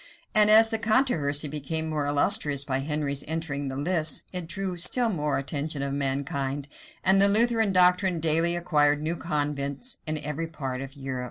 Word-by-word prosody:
[*] - - -37
And 210 0 +5
as 225 +1 +6
the 225 - -1
controversy 215 - +1
became 155 +2 -3
more 150 -2 -2
illustrious 145 -1 +1
by 135 -1 -2
Henry's 140 -1 -2
entering 150 -3 -3
the 135 - -5
lists, 155 +2 0
it 180 -2 -4
drew 190 +1 -2
still 230 +8 +3
more 150 -7 -1
the - - 0
attention 145 0 -4
of 140 0 -3
mankind; 140 0 -2 0.4
and 190 +1 +4
the 200 - +7
Lutheran 225 0 +3
doctrine 180 -1 +3
daily 165 +2 +2
acquired 150 -4 +2
new 160 +3 -2
converts 145 - -3
in 155 0 -1
every 150 +2 -3
part 135 -5 -5
of 135 +1 -9
Europe. 135 -2 -5
155 Hz, 180 wpm, -26 LUFS, 140-180 Hz, 0.4 s, the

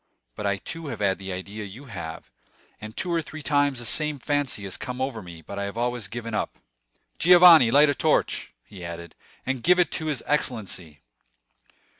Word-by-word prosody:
But 105 - -3
I 100 -1 +1
too 165 +10 -7
have 120 -5 -4
had 100 -2 +1
the 95 0 -6
idea 100 +4 -6
you 105 +8 -10
have, 85 -9 -8 0.5
and 110 0 -9
two 180 -2 -2
or 165 - +2
three 155 0 -9
times 145 -2 +2
the 120 - -2
same 150 +5 +1
fancy 145 -5 -1
has 95 -2 -4
come 125 0 -6
over 130 -4 -2
me; 85 -3 -11
but 100 +4 -7
I 100 - -2
have 100 +3 -6
always 120 -2 -2
given 115 +2 -6
it - - +1
up. - - -4 0.6
Giovanni, 175 -7 +8
light 145 +5 +6
a 145 - +2
torch," - - 0
he 95 -4 -11
added, 85 0 -7 0.3
"and 130 -1 -2
give 180 +6 +4
it 180 -3 +2
to 160 - -3
his 145 -6 -2
excellency." 95 - -2
120 Hz, 200 wpm, -25 LUFS, 100-145 Hz, 0.6 s, Giovanni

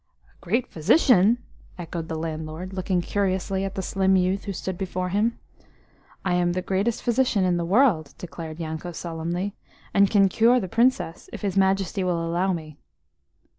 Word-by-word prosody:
"A - - -26
great 230 +8 0
physician?" 215 - +4 0.4
echoed 170 -1 -5
the 160 - -4
landlord, 160 +3 -5
looking 185 -1 0
curiously 190 0 -1
at 195 0 -4
the 190 - -3
slim 190 +1 +2
youth 185 +1 +1
who 200 - -3
stood 190 0 -4
before 185 0 -3
him. 215 +5 +1 0.9
"I 185 - +1
am 175 0 +2
the 185 0 -2
greatest 195 +5 -1
physician 240 -4 +2
in 180 -1 +2
the 170 - -1
world," 195 - +3
declared 165 -2 -8
Yanko 160 +2 -5
solemnly, 170 +4 -3 0.4
"and 200 -1 +5
can 200 -2 +5
cure 230 +6 +4
the 190 - -4
Princess 230 -5 +1
if - - -8
his 195 -2 -1
Majesty 195 0 +1
will 170 -2 0
allow 175 +3 0
me." 155 -4 -6
185 Hz, 170 wpm, -25 LUFS, 170-200 Hz, 0.9 s, and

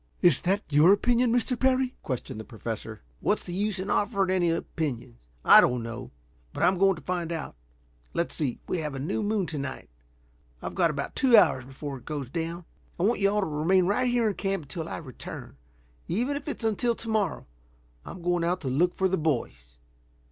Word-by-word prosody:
"Is 175 - +5
that 195 +3 +1
your 150 +5 +6
opinion, 240 +3 +2
Mr. 245 +1 +1
Parry?" 260 -1 +2
questioned 130 -2 -4
the - - -6
Professor. 110 -1 -6 0.2
"What's - - 0
the 175 - -6
use 205 +2 -1
in 190 +1 -3
offering 200 -3 +1
any 180 -2 +2
opinions? 125 - -4 0.2
I - - +10
don't 125 -1 +1
know. 115 +2 -6 0.4
But - - -2
I'm 185 0 +3
going 195 0 +4
to 160 - -12
find 175 -2 -2
out. 165 - -5 0.6
Let's 170 - 0
see. 140 -7 -1
We 180 - -1
have 150 -3 -4
a - - -4
new 150 +10 -2
moon 210 -2 0
to 155 -2 -5
night. 135 - -6 0.7
I've - - -6
got 175 -3 +3
about 140 -2 -4
two 255 -5 +6
hours 130 -10 +4
before 135 +1 -7
it - - -22
goes 145 -5 -5
down. 165 +2 -4 0.3
I - - 0
want 225 +5 +2
you 200 -1 +4
all 210 +1 +1
to - - 0
remain 165 +5 +2
right 245 +7 +1
here 240 -2 +2
in 210 - +1
camp 195 -3 -2
until 160 +3 -6
I - - -4
return. 130 -7 -9 0.5
Even 245 +10 0
if 285 +1 -6
it's 290 - -4
until 225 +2 +1
to 230 - -7
morrow. 215 -7 0 0.6
I'm 175 - -9
going 175 -1 +1
out 180 +2 0
to 135 - -3
look 170 +8 +2
for 190 - +2
the 190 0 0
boys." 65 - -2
175 Hz, 205 wpm, -27 LUFS, 145-205 Hz, 0.7 s, I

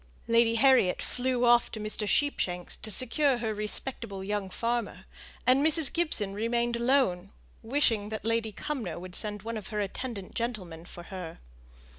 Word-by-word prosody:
Lady 230 0 +3
Harriet 255 -6 +4
flew 250 -1 -1
off 240 0 +5
to 220 - -7
Mr. 215 0 -2
Sheepshanks 180 -10 0
to 220 - -4
secure 255 +5 +4
her 220 -2 -2
respectable 210 -1 -2
young 205 -1 -3
farmer, 235 +4 -3 0.4
and 260 +3 +4
Mrs. 315 -1 +3
Gibson 270 - 0
remained 235 +3 0
alone, 235 -7 +1 0.3
wishing 225 -4 +1
that 220 0 -6
Lady 230 -1 0
Cumnor 220 - -4
would 180 +1 -9
send 210 -2 0
one 230 0 -4
of 210 - -7
her 210 - -4
attendant 205 0 -5
gentlemen 185 -9 -4
for 175 - -9
her. 180 -3 -7
225 Hz, 155 wpm, -28 LUFS, 200-245 Hz, 0.4 s, off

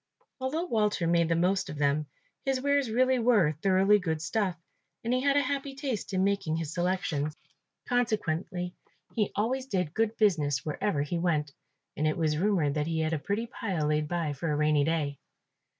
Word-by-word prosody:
Although 290 +7 -1
Walter 210 - +1
made 170 0 +3
the 165 - +3
most 185 +3 +1
of 150 - -6
them, 145 +1 +1 0.4
his 270 -1 0
wares 285 -1 +1
really 255 +3 +3
were 225 -10 +4
thoroughly 195 +2 +4
good 160 -4 -2
stuff, 190 +2 -1 0.5
and 235 +2 0
he 255 - +2
had 280 +1 +3
a - - +5
happy 275 0 -3
taste 265 -7 -3
in 190 -1 +1
making 195 -5 0
his 160 -1 -3
selections; 175 -4 -1 0.5
consequently 185 -7 -1 0.4
he 210 -3 0
always 255 +6 -1
did 180 - -1
good 225 0 0
business 150 - +2
wherever 150 0 0
he 170 +4 -2
went, 150 -4 0 0.4
and 155 - 0
it 155 - 0
was 155 -2 +1
rumoured 175 -7 +2
that 150 0 -1
he 165 -1 0
had 160 0 0
a 160 - 0
pretty 205 +8 -2
pile 190 -9 -3
laid 150 0 +1
by 165 -3 -1
for 150 +3 -3
a - - +1
rainy 150 -1 +3
day. 150 -3 -1
180 Hz, 185 wpm, -29 LUFS, 155-225 Hz, 0.5 s, a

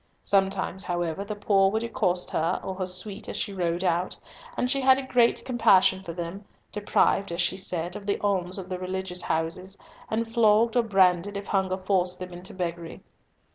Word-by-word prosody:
Sometimes, 195 -1 +1
however, 175 0 -2
the 210 +1 -5
poor 195 -2 +3
would 220 +3 -1
accost 180 -6 0
her 160 +1 0
or 190 - -4
her 185 -1 -4
suite 195 +3 0
as - - -4
she 200 - -2
rode 175 -1 -1
out; 175 0 0 0.4
and 250 - +1
she 275 +2 +1
had 260 0 +6
a 270 - -4
great 245 -2 +2
compassion 190 -6 +4
for 180 -3 -7
them, 175 +4 -6 0.3
deprived, 205 -2 +1
as 170 - -4
she 175 +1 +1
said, 180 -1 -2
of 205 -1 -8
the 200 - +1
alms 190 -3 -1
of 190 -2 -6
the 185 -1 -4
religious 185 -1 -3
houses, 170 +4 -3 0.3
and 225 +1 -1
flogged 225 0 +3
or 245 - +5
branded 195 -2 +2
if 200 - -6
hunger 190 -2 0
forced 185 -1 0
them 185 -1 -8
into 180 +1 -7
beggary. 170 -2 -5
190 Hz, 190 wpm, -26 LUFS, 180-205 Hz, 0.4 s, had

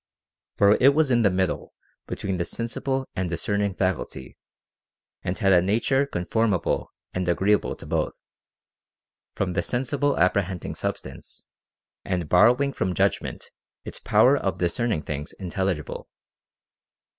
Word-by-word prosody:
For 100 +1 +5
it 140 +2 +6
was 155 -3 +3
in 120 -1 +4
the 105 - +4
middle 95 0 -2 0.3
between 95 -1 -3
the 85 - 0
sensible 130 +7 -3
and 90 -1 -1
discerning 100 +3 -1
faculty, 80 -8 -3 0.9
and 90 - -3
had 95 -2 +3
a 90 - +6
nature 120 +8 +1
conforma 105 -1 0
ble - - -2 0.2
and 90 -1 -1
agreeable 100 +4 +2
to - - -11
both; - - -1 1.2
from 90 -2 -1
the 90 - +1
sensible 135 - -1
apprehending 90 0 0
substance, - - -6 0.6
and 90 -4 -2
borrowing 125 +9 +4
from 90 -1 -1
judgment - - -1 0.3
its - - -8
power - - +4
of - - -1
dis 85 -1 -1
cerning 115 -11 -1
things 75 0 -5
intelligible. 95 -4 -3
95 Hz, 135 wpm, -25 LUFS, 90-115 Hz, 1.2 s, it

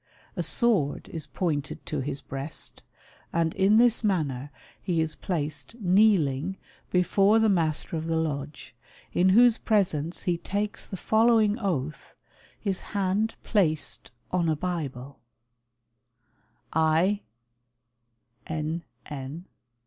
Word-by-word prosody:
A - - -1
sword 205 - +1
is 160 -2 -6
pointed 150 -6 -3
to 150 - -3
his 140 +1 -3
breast, 135 +3 -7 0.5
and 165 -1 +1
in 200 +3 +4
this 235 -1 +4
manner 145 -9 0 0.3
he 175 -4 0
is 160 -1 0
placed 155 +3 -3
kneeling 185 -5 +3 0.3
before 195 +4 +4
the 220 0 +4
Master 165 -4 0
of 160 +1 -4
the 165 0 +1
Lodge, 150 -2 -4 0.4
in 185 +2 +4
whose 235 +4 +6
presence 175 -7 0
he 175 -2 0
takes 205 +3 -3
the 190 - -6
following 220 +1 +3
oath, 155 - -3 0.4
his 195 -3 -1 0.2
hand 200 +3 +1
placed 165 -8 0 0.2
on 175 -2 +1
a 155 - +2
Bible: 145 -6 -4 1.5
"I, 160 +6 +3 1.3
N. 160 +2 -3 0.2
N. 145 +4 -7
170 Hz, 115 wpm, -27 LUFS, 155-200 Hz, 1.5 s, whose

